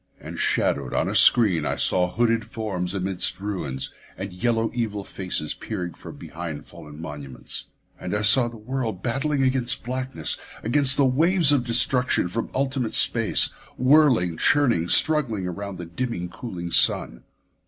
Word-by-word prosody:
And -, -, -9 dB
shadowed -, -, -1 dB
on -, -, 0 dB
a -, -, -3 dB
screen, 100 Hz, -10 st, +4 dB
I -, -, -2 dB
saw 90 Hz, -1 st, +2 dB
hooded 115 Hz, 0 st, 0 dB
forms 100 Hz, -5 st, -4 dB
amidst 95 Hz, -1 st, -1 dB
ruins, 80 Hz, -10 st, -4 dB, 0.2 s
and 95 Hz, 0 st, -7 dB
yellow 115 Hz, +4 st, -1 dB
evil 110 Hz, -4 st, -3 dB
faces 90 Hz, -6 st, -4 dB
peering 90 Hz, -2 st, -6 dB
from -, -, -12 dB
behind 80 Hz, -3 st, -8 dB
fallen 75 Hz, 0 st, -13 dB
monuments. 70 Hz, -5 st, -5 dB, 0.3 s
And 90 Hz, -, -4 dB
I 105 Hz, -, -1 dB
saw 120 Hz, +4 st, +5 dB
the 120 Hz, -1 st, -9 dB
world 115 Hz, -3 st, -5 dB
battling 135 Hz, +3 st, -1 dB
against 130 Hz, -2 st, 0 dB
blackness; 130 Hz, +2 st, -3 dB, 0.2 s
against 130 Hz, +3 st, +2 dB
the 140 Hz, -, +3 dB
waves 160 Hz, +4 st, +4 dB
of 135 Hz, -4 st, +1 dB
destruction 125 Hz, -4 st, +2 dB
from 115 Hz, +5 st, -4 dB
ultimate 130 Hz, -3 st, -2 dB
space; -, -, +5 dB, 0.3 s
whirling, 130 Hz, -, +3 dB
churning; 115 Hz, -, +2 dB
struggling 130 Hz, -11 st, +2 dB
around 100 Hz, +2 st, -6 dB
the 90 Hz, -, -7 dB
dimming, 90 Hz, 0 st, -5 dB
cooling 90 Hz, -6 st, -7 dB
sun. -, -, +3 dB
110 Hz, 150 wpm, -23 LUFS, 90-130 Hz, 0.3 s, saw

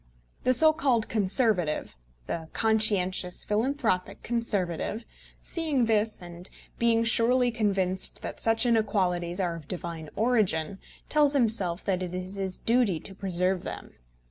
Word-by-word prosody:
The 255 Hz, -, +3 dB
so 315 Hz, +4 st, +5 dB
called 255 Hz, -7 st, +1 dB
Conservative, 200 Hz, -, 0 dB, 0.3 s
the 160 Hz, -, -5 dB
conscientious 200 Hz, -5 st, +2 dB
philanthropic 215 Hz, -4 st, -1 dB
Conservative, 215 Hz, -2 st, -2 dB, 0.4 s
seeing 305 Hz, -7 st, -1 dB
this, 220 Hz, -3 st, 0 dB
and 175 Hz, +1 st, -10 dB, 0.3 s
being 230 Hz, -1 st, +3 dB
surely 240 Hz, +2 st, +3 dB
convinced 195 Hz, -5 st, -1 dB
that -, -, -6 dB
such 225 Hz, +2 st, +4 dB
inequalities 190 Hz, -6 st, 0 dB
are 175 Hz, -3 st, -1 dB
of 160 Hz, -3 st, -11 dB
divine 170 Hz, -3 st, -6 dB
origin, 200 Hz, -7 st, +1 dB, 0.3 s
tells 295 Hz, -2 st, +3 dB
himself 215 Hz, -9 st, 0 dB
that 185 Hz, -2 st, 0 dB
it 180 Hz, -1 st, -4 dB
is 185 Hz, +1 st, -5 dB
his 190 Hz, -2 st, -3 dB
duty 230 Hz, -8 st, +1 dB
to 195 Hz, -, -9 dB
preserve 185 Hz, -1 st, 0 dB
them. -, -, -8 dB
205 Hz, 130 wpm, -27 LUFS, 180-230 Hz, 0.4 s, so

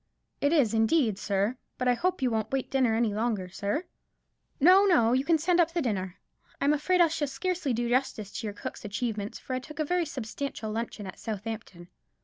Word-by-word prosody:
"It 285 Hz, -, +3 dB
is, 280 Hz, -10 st, +3 dB
indeed, 225 Hz, -1 st, +2 dB
sir; 205 Hz, +5 st, 0 dB, 0.2 s
but 250 Hz, -, -1 dB
I 250 Hz, -, +5 dB
hope 360 Hz, +3 st, -1 dB
you 250 Hz, -, +2 dB
won't 220 Hz, -1 st, -1 dB
wait 270 Hz, -1 st, -2 dB
dinner 255 Hz, -5 st, +2 dB
any 225 Hz, -2 st, +1 dB
longer, 215 Hz, -4 st, -1 dB
sir?" 200 Hz, -, -2 dB, 0.8 s
"No, 365 Hz, +7 st, +7 dB
no; 240 Hz, -, +4 dB
you 260 Hz, +1 st, +2 dB
can 330 Hz, +2 st, +3 dB
send 345 Hz, +3 st, +2 dB
up 335 Hz, -1 st, +3 dB
the 345 Hz, -, 0 dB
dinner. 190 Hz, -6 st, -2 dB, 0.4 s
I'm 285 Hz, +1 st, +3 dB
afraid 360 Hz, +5 st, +1 dB
I 340 Hz, -, +7 dB
shall 315 Hz, -2 st, -1 dB
scarcely 350 Hz, +1 st, -2 dB
do 240 Hz, 0 st, 0 dB
justice 240 Hz, -5 st, 0 dB
to 225 Hz, -, -4 dB
your 205 Hz, -, -4 dB
cook's -, -, -7 dB
achievements, 210 Hz, 0 st, -3 dB
for 260 Hz, -, -6 dB
I 255 Hz, -, 0 dB
took 300 Hz, +3 st, -11 dB
a 310 Hz, -, 0 dB
very 355 Hz, +1 st, 0 dB
substantial 235 Hz, -3 st, -5 dB
luncheon 225 Hz, -2 st, -4 dB
at 190 Hz, -, -9 dB
Southampton." 210 Hz, -5 st, -6 dB
245 Hz, 205 wpm, -28 LUFS, 215-300 Hz, 0.8 s, No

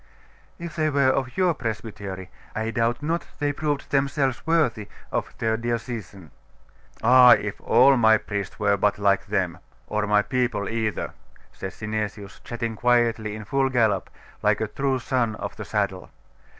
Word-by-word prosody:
'If 170 Hz, -2 st, -7 dB
they 155 Hz, -2 st, +1 dB
were 140 Hz, -2 st, +3 dB
of 130 Hz, +1 st, -2 dB
your 180 Hz, -2 st, +3 dB
presbytery, 105 Hz, -, -6 dB, 0.2 s
I 110 Hz, +1 st, -2 dB
doubt 115 Hz, +4 st, 0 dB
not 165 Hz, +3 st, -1 dB
they 145 Hz, -1 st, 0 dB
proved 145 Hz, -1 st, -2 dB
themselves 140 Hz, -1 st, 0 dB
worthy 145 Hz, -11 st, +1 dB, 0.2 s
of -, -, -2 dB
their 110 Hz, -1 st, 0 dB
diocesan.' 115 Hz, -, -5 dB, 0.7 s
'Ah, 125 Hz, +1 st, +8 dB
if 105 Hz, -3 st, -2 dB
all 130 Hz, +4 st, +5 dB
my 110 Hz, -2 st, +6 dB
priests 100 Hz, -3 st, -5 dB
were 100 Hz, -1 st, +2 dB
but 105 Hz, +1 st, +1 dB
like 100 Hz, 0 st, +2 dB
them! 95 Hz, -4 st, -1 dB, 0.3 s
or 105 Hz, 0 st, -1 dB
my 105 Hz, 0 st, +4 dB
people 120 Hz, -6 st, -1 dB
either!' 110 Hz, -2 st, -2 dB, 0.4 s
said 95 Hz, -, -6 dB
Synesius, 105 Hz, -1 st, -5 dB
chatting 115 Hz, -1 st, -4 dB
quietly 115 Hz, -2 st, +1 dB
in 110 Hz, -1 st, -8 dB
full 135 Hz, +3 st, +1 dB
gallop, 110 Hz, -7 st, +1 dB, 0.3 s
like -, -, +2 dB
a -, -, 0 dB
true 135 Hz, -1 st, -1 dB
son 120 Hz, -3 st, -1 dB
of -, -, -6 dB
the 110 Hz, -, -7 dB
saddle. 100 Hz, -3 st, -2 dB
115 Hz, 155 wpm, -24 LUFS, 105-130 Hz, 0.7 s, Ah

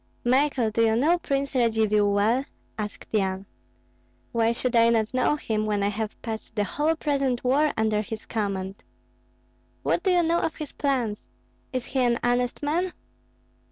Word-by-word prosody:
"Michael, 255 Hz, -2 st, +2 dB
do 230 Hz, +2 st, +2 dB
you 220 Hz, -1 st, +3 dB
know 315 Hz, +9 st, +3 dB
Prince 275 Hz, -3 st, -2 dB
Radzivill 220 Hz, -4 st, +2 dB
well?" 215 Hz, +6 st, +2 dB, 0.3 s
asked 210 Hz, -1 st, -6 dB
Yan. 195 Hz, -2 st, 0 dB, 0.9 s
"Why 230 Hz, -1 st, +2 dB
should 245 Hz, +1 st, -2 dB
I 230 Hz, 0 st, +6 dB
not 225 Hz, -1 st, +1 dB
know 255 Hz, +3 st, +2 dB
him, 215 Hz, -7 st, -2 dB
when 205 Hz, -1 st, 0 dB
I 200 Hz, -, +2 dB
have 215 Hz, +1 st, -4 dB
passed 220 Hz, -1 st, -6 dB
the 210 Hz, -, +1 dB
whole 300 Hz, +9 st, 0 dB
present 275 Hz, -5 st, 0 dB
war 280 Hz, +5 st, +3 dB
under 220 Hz, -1 st, +1 dB
his 220 Hz, 0 st, -7 dB
command?" 195 Hz, -3 st, -3 dB, 1.0 s
"What -, -, +1 dB
do 385 Hz, -, +1 dB
you 355 Hz, -1 st, +4 dB
know 335 Hz, +1 st, +2 dB
of 320 Hz, -, -2 dB
his 305 Hz, -2 st, -7 dB
plans? 250 Hz, -7 st, -1 dB, 0.4 s
Is 255 Hz, -3 st, -3 dB
he 270 Hz, -, -2 dB
an 240 Hz, -2 st, +3 dB
honest 245 Hz, +2 st, 0 dB
man?" 345 Hz, +5 st, 0 dB
235 Hz, 165 wpm, -26 LUFS, 215-275 Hz, 1.0 s, I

